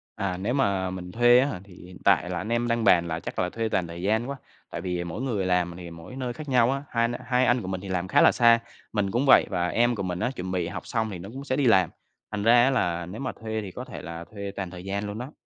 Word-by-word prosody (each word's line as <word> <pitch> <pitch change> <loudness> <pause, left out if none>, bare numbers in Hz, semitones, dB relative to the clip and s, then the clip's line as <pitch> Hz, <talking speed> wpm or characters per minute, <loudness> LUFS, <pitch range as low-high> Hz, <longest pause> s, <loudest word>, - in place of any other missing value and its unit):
À, 95 -2 -2
nếu 100 +6 -2
mà 100 -8 +1
mình 90 -1 -6
thuê 120 +3 +6
á 130 - +3
hả 140 - -4
thì 100 -2 -16
hiện 90 0 -12
tại - - +3
là - - -2
anh 110 - -4
em 120 +1 +1
đang 115 -1 0
bàn 85 -5 +5
là 80 -1 -2
chắc - - -6
là 90 - +1
thuê 115 +3 -2
toàn 90 -5 0
thời 85 +1 -8
gian 110 +6 0
quá, 140 - -3 0.3
tại - - -5
vì 90 -1 -2
mỗi 85 +6 -5
người 110 -8 -1
làm 90 -1 +1
thì 90 -1 -8
mỗi 85 +9 -10
nơi 125 -2 -3
khác 150 +3 -8
nhau 125 -1 +4
á, 135 +1 -2
hai 115 -1 +1 0.2
hai 125 0 +2
anh 120 0 +3
của 95 - -7
mình 95 -1 -3
thì 100 - -8
làm 90 -1 -1
khá - - +4
là - - +7
xa, 115 -1 +5 0.3
mình 100 -2 0
cũng 120 +6 +1
vậy 135 - +7
và 90 -3 0
em 120 +5 +2
của 100 - -3
mình 90 -1 -3
á 120 - 0
chuẩn 90 -3 -5
bị 90 -2 -1
học 85 - -7
xong 110 -2 -1
thì 95 - -5
nó 95 +4 -8
cũng 135 +1 -7
sẽ 130 - 0
đi 140 - +1
làm. 95 -7 +5 0.4
Thành 105 -1 -3
ra 120 +2 +6
á 130 - +4
là 85 -9 0
nếu 95 +9 -8
mà 130 - -2
thuê 110 -1 -3
thì 100 -3 -7
có 125 +7 -7
thể - - -8
là 85 -1 -7
thuê 100 -2 -5
toàn 100 -2 -4
thời 90 0 -9
gian 100 +2 -3
luôn 105 +1 -5
đó. 125 +5 -6
100 Hz, 305 wpm, -26 LUFS, 90-120 Hz, 0.4 s, là